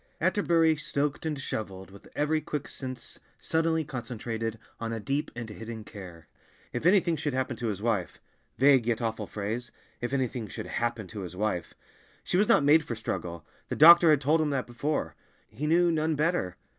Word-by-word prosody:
Atterbury 165 Hz, -4 st, +3 dB
stoked 145 Hz, 0 st, -2 dB
and 150 Hz, -2 st, -2 dB
shoveled 95 Hz, -7 st, -5 dB
with 100 Hz, -, -14 dB
every 155 Hz, +1 st, +1 dB
quick 150 Hz, -1 st, -4 dB
sense 130 Hz, -3 st, -7 dB, 0.2 s
suddenly 160 Hz, 0 st, +1 dB
concentrated 115 Hz, -3 st, -4 dB, 0.2 s
on 115 Hz, 0 st, -3 dB
a 115 Hz, -, -3 dB
deep 135 Hz, +8 st, -2 dB
and 120 Hz, -2 st, -5 dB
hidden 110 Hz, +1 st, -7 dB
care. 90 Hz, -6 st, -11 dB, 0.5 s
If 120 Hz, +7 st, 0 dB
anything 180 Hz, -3 st, +4 dB
should 145 Hz, -3 st, -2 dB
happen 130 Hz, -1 st, -1 dB
to 120 Hz, -, -3 dB
his 105 Hz, -1 st, -3 dB
wife—vague, 120 Hz, +4 st, +1 dB
yet 115 Hz, -2 st, +1 dB
awful 110 Hz, -3 st, -2 dB
phrase—if 120 Hz, +3 st, -6 dB
anything 125 Hz, -4 st, -1 dB
should -, -, -6 dB
"happen" 120 Hz, -2 st, -2 dB
to 110 Hz, -, -7 dB
his 90 Hz, -1 st, -7 dB
wife! 100 Hz, -3 st, -2 dB, 0.5 s
She -, -, -2 dB
was 205 Hz, +3 st, +4 dB
not 145 Hz, -, +5 dB
made 150 Hz, +3 st, +6 dB
for 120 Hz, -6 st, -4 dB
struggle; 85 Hz, -6 st, -4 dB, 0.2 s
the -, -, -2 dB
doctor 170 Hz, +2 st, +9 dB
had 150 Hz, -3 st, +5 dB
told 155 Hz, +4 st, +3 dB
him 155 Hz, -, +1 dB
that 135 Hz, -3 st, -1 dB
before. 140 Hz, +5 st, -2 dB, 0.4 s
He 135 Hz, +8 st, -3 dB
knew, 170 Hz, +2 st, +4 dB
none 160 Hz, 0 st, +1 dB
better! 150 Hz, -, 0 dB
130 Hz, 175 wpm, -28 LUFS, 110-155 Hz, 0.5 s, doctor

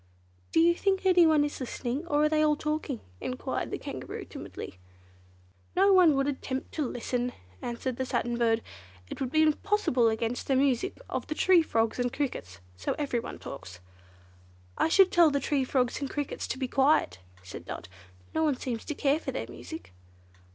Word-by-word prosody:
"Do -, -, +3 dB
you 340 Hz, +1 st, +6 dB
think 385 Hz, +2 st, 0 dB
anyone 330 Hz, -5 st, +5 dB
is 290 Hz, -, -5 dB
listening, 260 Hz, +4 st, -3 dB
or 295 Hz, -2 st, +2 dB
are 305 Hz, -, +4 dB
they 310 Hz, 0 st, +2 dB
all 300 Hz, -1 st, +4 dB
talking?" 300 Hz, -4 st, -3 dB, 0.2 s
enquired 125 Hz, -, -3 dB
the -, -, -3 dB
Kangaroo -, -, -6 dB
timidly. 90 Hz, -, -8 dB, 1.0 s
"Nobody 375 Hz, -3 st, +6 dB
would 275 Hz, -1 st, +1 dB
attempt 265 Hz, -1 st, -3 dB
to 300 Hz, -4 st, -1 dB
listen," 245 Hz, +1 st, -2 dB, 0.3 s
answered 240 Hz, +1 st, -3 dB
the 260 Hz, -, -1 dB
Satin 240 Hz, -1 st, -1 dB
Bird, 230 Hz, -1 st, +2 dB, 0.5 s
"it -, -, -6 dB
would 260 Hz, -, -1 dB
be 315 Hz, +1 st, +4 dB
impossible 310 Hz, -, +2 dB
against 225 Hz, +2 st, -2 dB
the 270 Hz, -, +2 dB
music 270 Hz, +5 st, +1 dB
of -, -, -4 dB
the 310 Hz, -, -3 dB
tree 370 Hz, 0 st, +5 dB
frogs 225 Hz, -6 st, 0 dB
and 245 Hz, 0 st, +1 dB
crickets, 90 Hz, -, -4 dB
so 90 Hz, 0 st, -2 dB
everyone 245 Hz, -5 st, -2 dB
talks." 90 Hz, -9 st, -9 dB, 1.0 s
"I -, -, +2 dB
should 380 Hz, +2 st, +6 dB
tell 340 Hz, -2 st, +6 dB
the 280 Hz, -1 st, +1 dB
tree 275 Hz, 0 st, 0 dB
frogs 255 Hz, -1 st, 0 dB
and 275 Hz, -, -2 dB
crickets 290 Hz, -2 st, -3 dB
to -, -, -3 dB
be 260 Hz, -1 st, -2 dB
quiet," 270 Hz, -, +2 dB, 0.2 s
said 90 Hz, -, -9 dB
Dot, 85 Hz, -, -7 dB, 0.5 s
"no 320 Hz, -, +1 dB
one 295 Hz, -4 st, +2 dB
seems 235 Hz, -4 st, -4 dB
to 300 Hz, -, -4 dB
care 285 Hz, +2 st, +2 dB
for -, -, -4 dB
their -, -, -3 dB
music." 320 Hz, -, -9 dB
275 Hz, 180 wpm, -29 LUFS, 245-315 Hz, 1.0 s, you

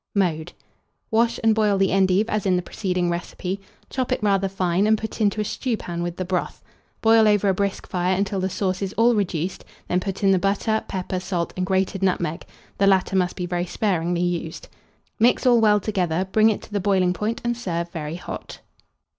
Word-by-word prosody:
Mode. 175 Hz, -4 st, 0 dB, 0.6 s
Wash 230 Hz, +1 st, +2 dB
and 225 Hz, -1 st, +5 dB
boil 210 Hz, -2 st, +2 dB
the 195 Hz, -1 st, +2 dB
endive 195 Hz, +2 st, +3 dB
as 215 Hz, -3 st, -1 dB
in 185 Hz, -, +3 dB
the 180 Hz, -, 0 dB
preceding 180 Hz, -2 st, -1 dB
recipe; 180 Hz, +2 st, -4 dB, 0.3 s
chop 260 Hz, -2 st, -2 dB
it -, -, -1 dB
rather 195 Hz, -2 st, +2 dB
fine, 185 Hz, +1 st, +1 dB
and 220 Hz, 0 st, +4 dB
put 220 Hz, +1 st, -6 dB
into 210 Hz, 0 st, +2 dB
a -, -, +1 dB
stewpan 210 Hz, -6 st, -3 dB
with 175 Hz, 0 st, -4 dB
the 185 Hz, -, -3 dB
broth; 180 Hz, 0 st, -3 dB, 0.4 s
boil 225 Hz, -1 st, +5 dB
over 205 Hz, -1 st, +3 dB
a -, -, +3 dB
brisk 200 Hz, +1 st, -2 dB
fire 180 Hz, +1 st, 0 dB
until 195 Hz, 0 st, -1 dB
the 190 Hz, 0 st, -1 dB
sauce 185 Hz, 0 st, -2 dB
is 195 Hz, 0 st, -3 dB
all 235 Hz, +2 st, +4 dB
reduced; 185 Hz, -4 st, -2 dB, 0.2 s
then 180 Hz, -, +1 dB
put 195 Hz, +1 st, -5 dB
in 195 Hz, -, +5 dB
the 190 Hz, -, +3 dB
butter, 205 Hz, +3 st, 0 dB
pepper, 185 Hz, 0 st, -3 dB
salt, 175 Hz, -2 st, -3 dB
and 185 Hz, 0 st, -2 dB
grated 190 Hz, 0 st, 0 dB
nutmeg 175 Hz, -3 st, -1 dB, 0.3 s
(the 195 Hz, -, +4 dB
latter 190 Hz, 0 st, +3 dB
must 180 Hz, -1 st, +1 dB
be 180 Hz, -, -3 dB
very 175 Hz, 0 st, -2 dB
sparingly 175 Hz, -3 st, 0 dB
used); 170 Hz, -2 st, -3 dB, 0.5 s
mix 240 Hz, +3 st, +3 dB
all 240 Hz, -2 st, +5 dB
well 210 Hz, -1 st, +5 dB
together, 185 Hz, -3 st, -1 dB
bring 220 Hz, +2 st, +5 dB
it 215 Hz, -, -2 dB
to -, -, -13 dB
the 205 Hz, -, +1 dB
boiling 190 Hz, -2 st, +2 dB
point, 215 Hz, +5 st, -2 dB
and 240 Hz, 0 st, 0 dB
serve 170 Hz, -7 st, -3 dB
very 155 Hz, -1 st, -5 dB
hot. 180 Hz, -, -8 dB
190 Hz, 205 wpm, -23 LUFS, 180-210 Hz, 0.6 s, and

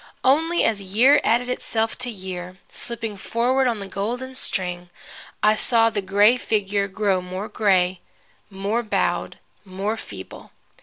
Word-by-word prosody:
Only 325 Hz, +6 st, +3 dB
as 215 Hz, -3 st, +1 dB
year 230 Hz, +10 st, +4 dB
added 240 Hz, +2 st, +2 dB
itself 225 Hz, -2 st, -1 dB
to 250 Hz, 0 st, -4 dB
year, 185 Hz, -3 st, -7 dB
slipping 230 Hz, -3 st, -3 dB
forward 250 Hz, +6 st, +1 dB
on 230 Hz, -3 st, 0 dB
the 200 Hz, -, -5 dB
golden 235 Hz, +7 st, -4 dB
string, 180 Hz, -7 st, 0 dB, 0.5 s
I 215 Hz, -, +6 dB
saw 230 Hz, +1 st, +2 dB
the 205 Hz, -, -2 dB
gray 205 Hz, +5 st, +4 dB
figure 205 Hz, -4 st, 0 dB
grow 195 Hz, -1 st, 0 dB
more 185 Hz, +3 st, -5 dB
gray, 185 Hz, -4 st, +2 dB, 0.5 s
more 200 Hz, +4 st, -1 dB
bowed, 220 Hz, -, -1 dB, 0.3 s
more 200 Hz, +3 st, -3 dB
feeble. 95 Hz, -, -10 dB
210 Hz, 140 wpm, -23 LUFS, 190-235 Hz, 0.5 s, I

